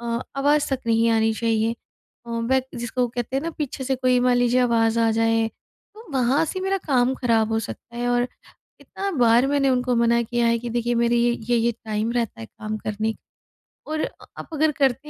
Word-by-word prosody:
अ, 235 0 -2 0.2
आवाज़ 290 +2 +2
तक 265 - -1
नहीं 230 0 +3
आनी 225 0 +2
चाहिए। 225 0 0 0.5
अ, 235 - -8
वे 235 +3 +1
जिसको 240 +1 -1
कहते 240 +2 -4
हैं 275 - -1
ना 335 - -3
पीछे 270 -2 -4
से 265 - 0
कोई 255 -1 +2
मान 245 0 +3
लीजिए 245 +1 +3
आवाज़ 230 -2 +2
आ 225 0 +3
जाए, 225 0 +2 0.5
तो 445 +2 -13
वहाँ 260 +3 +2
से 370 +4 -4
मेरा 385 +1 0
काम 260 -2 +2
खराब 225 -3 +1
हो 225 - +2
सकता 235 +2 -9
है 245 0 -1
और 245 0 +1 0.5
इतना 395 0 -5
बार 240 +2 +5
मैंने 280 -1 +2
उनको 250 -1 +1
मना 235 0 +3
किया 240 +1 0
है 230 0 +2
कि 240 +1 -6
देखिए 240 +1 0
मेरी 235 0 +2
ये 240 - +3 0.2
ये-ये 235 0 +2
टाइम 220 +1 -1
रहता 235 - -2
है 110 - -7
काम 215 - -6
करने 215 +1 -1
का - - -22 0.7
और 310 - -1
अ - - -1 0.3
आप - - -8
अगर 310 +1 +2
करते 275 +2 +1
240 Hz, 210 wpm, -23 LUFS, 230-260 Hz, 0.7 s, बार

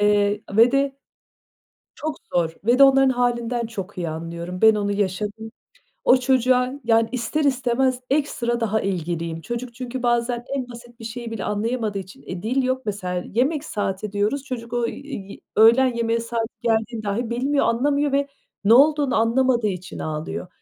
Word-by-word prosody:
eee, 205 0 +3 0.2
ve 235 +3 +6
de 275 0 +1 1.0
çok 310 -1 -4 0.2
zor 165 -2 +1
ve 240 +4 +3
de - - +7
onların 270 -1 +5
hâlinden 240 -1 0
çok 205 -4 -7
iyi 170 -2 -2
anlıyorum. 170 +3 -6
Ben 220 -1 +7
onu 205 -1 -1
yaşadım. 205 +2 -2 0.5
O 255 - +7
çocuğa, 255 0 +2
yani, 225 0 +3
ister 275 +5 -1
istemez 255 -1 +1
ekstra 240 -5 0
daha 220 -1 +1
ilgiliyim. 170 -3 -3
Çocuk 240 +3 -5
çünkü 255 0 -5
bazen 240 0 0
en 255 -2 -3
basit 240 0 -12
bir 225 - -8
şeyi 235 0 -6
bile 220 -4 -4
anlayamadığı 215 0 -1
için, 185 0 -10
eee, 180 -1 -7
dil 255 +5 +1
yok 260 0 0
mesela, 180 -3 -3
"yemek 280 +5 +1
saati" 200 -3 -3
diyoruz, 210 +7 0
çocuk 235 -3 -6
o, 240 -1 +1
iii, 270 -9 -8 0.2
öğlen 235 +3 +6
yemeğe 230 0 0
saati 230 -1 -3
geldiğini 225 -1 0
dâhi 220 +4 -2
bilmiyor, 275 +4 +1
anlamıyor 280 +4 +1
ve 280 0 +1 0.4
ne 220 +3 +6
olduğunu 290 -1 +4
anlamadığı 235 0 +2
için 180 -2 -6
ağlıyor. 155 +3 -4
235 Hz, 165 wpm, -23 LUFS, 205-255 Hz, 1.0 s, de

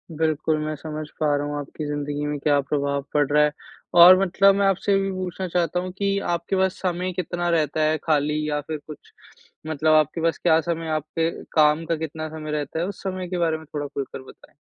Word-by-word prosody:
बिल्कुल, 155 0 0
मैं 155 0 -3
समझ 155 +1 -6
पा 150 -2 +2
रहा 145 0 -1
हूँ 145 0 -3
आपकी 145 +2 -6
ज़िंदगी 145 0 -3
में 150 0 -2
क्या 145 0 +2
प्रभाव 140 0 -1
पड़ 145 -1 +3
रहा 150 0 +5
है। 150 - +2 0.5
और 180 +2 +10
मतलब 195 +1 +4
मैं 200 0 +2
आपसे 195 +1 +1
ये 195 - +4
भी 195 0 -1
पूछना 185 0 -4
चाहता 175 0 0
हूँ 185 +1 -4
कि 200 0 0
आपके 170 +2 -1
पास 190 0 +1
समय 180 0 -1
कितना 175 0 -2
रहता 155 -2 +1
है 155 +1 +2
खाली 150 -1 +1
या 150 0 0
फिर 155 +2 -5
कुछ? 150 - -12 0.6
मतलब 155 0 +2
आपके 155 +2 +2
पास 165 0 +1
क्या 160 -2 +3
समय 165 -1 -3
आपके 155 +2 -1 0.2
काम 155 +1 +4
का 165 - 0
कितना 155 0 -5
समय 155 -1 -6
रहता 150 +1 -3
है, 170 - 0
उस 200 - -8
समय 185 -1 -3
के 180 - -2
बारे 165 -2 +1
में 160 - -13
थोड़ा 145 -1 -3
खुल 140 -1 -4
कर - - -6
बताएँ। - - -17
160 Hz, 225 wpm, -23 LUFS, 150-175 Hz, 0.6 s, और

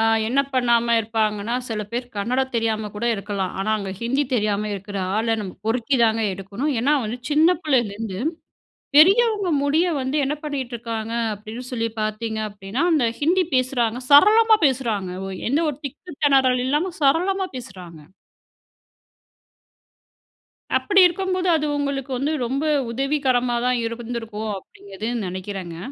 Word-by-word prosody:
அ - - +3 0.2
என்ன 255 +5 +2
பண்ணாம 235 -2 +3
இருப்பாங்கன்னா, 220 0 -1
சில 215 -2 -3
பேர் 245 +1 -2
கன்னடம் 255 +6 -1
தெரியாம 220 -2 -1
கூட 235 +3 -2
இருக்கலாம். 200 -2 -3
ஆனா, 215 - -1
அங்க 195 -2 -5
ஹிந்தி 265 +5 +1
தெரியாம 210 -2 0
இருக்கிற 200 +1 -6 0.2
ஆள 225 - 0
நம்ம 190 -3 -6
பொறுக்கி 245 +4 +1
தாங்க 225 0 +2
எடுக்கணும். 200 +10 -3
ஏன்னா 280 +5 +2
வந்து 230 +4 -4
சின்ன 320 +4 +4
பிள்ளைலருந்து, 225 -8 -1 0.8
பெரியவங்க 405 +4 +5
முடிய 310 +5 +2
வந்து 265 +3 -2
என்ன 280 - -1
பண்ணிட்டு 270 -5 -4
இருக்காங்க 230 -1 -5 0.2
அப்படின்னு 215 +4 -8
சொல்லி 230 -1 -1
பாத்தீங்க 215 +1 -2
அப்படின்னா 205 +5 -4
அந்த 275 -7 +3
ஹிந்தி 355 +5 +3
பேசுறாங்க, 250 -2 +1
சரளமா 435 +9 +7
பேசுறாங்க. 225 -8 -1 0.4
எந்த 290 +5 +2
ஒரு 285 - -8
திக்கு, 315 +5 -10
திணறல் 260 -3 +4
இல்லாம 310 +7 0
சரளமா 365 +7 +2
பேசுகிறாங்க. 180 -9 -10 2.8
அப்படி 400 -1 +3
இருக்கும்போது 370 +1 -1
அது 305 -1 -1
உங்களுக்கு 280 -2 -3
வந்து 285 +4 -1
ரொம்ப 270 +5 -2 0.3
உதவிகரமா 255 -2 0
தான் 250 -1 +2
இருந்திருக்கும், 230 -2 -5
அப்படிங்கிறது 200 +4 -8 0.2
நினைக்குறேங்க. 185 -2 -6
240 Hz, 130 wpm, -22 LUFS, 215-285 Hz, 2.8 s, சரளமா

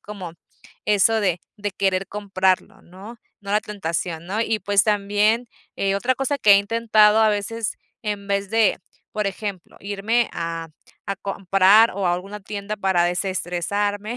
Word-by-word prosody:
como 190 -5 -8 0.5
eso 215 +2 +3
de 180 -4 0 0.2
de 205 0 -3
querer 190 0 -1
comprarlo, 190 -2 -1
¿no?, 200 +6 -12 0.2
no 200 - -8
la 210 - +3
tentación, 170 -4 -4
¿no? 210 +4 -2
Y, 225 -1 0
pues 200 -1 +2
también, 210 +3 +1 0.3
eh, 195 0 0
otra 245 +6 +1
cosa 270 +1 -1
que 210 -5 +6
he 200 - +8
intentado, 215 0 +3
a 220 - +5
veces, 210 +2 -2 0.3
en 205 -2 -4
vez 200 -1 -1
de, 225 -1 +3 0.3
por 210 -1 -1
ejemplo, 195 -2 -6
irme 205 +4 0
a 165 -1 -4 0.4
a 200 - -2
comprar, 195 +3 +4
o 195 -1 -2
a 175 - +2
alguna 200 +3 -7
tienda 205 +1 -5
para 190 -3 +2
desestresarme, 200 +4 -2
200 Hz, 155 wpm, -22 LUFS, 190-215 Hz, 0.5 s, he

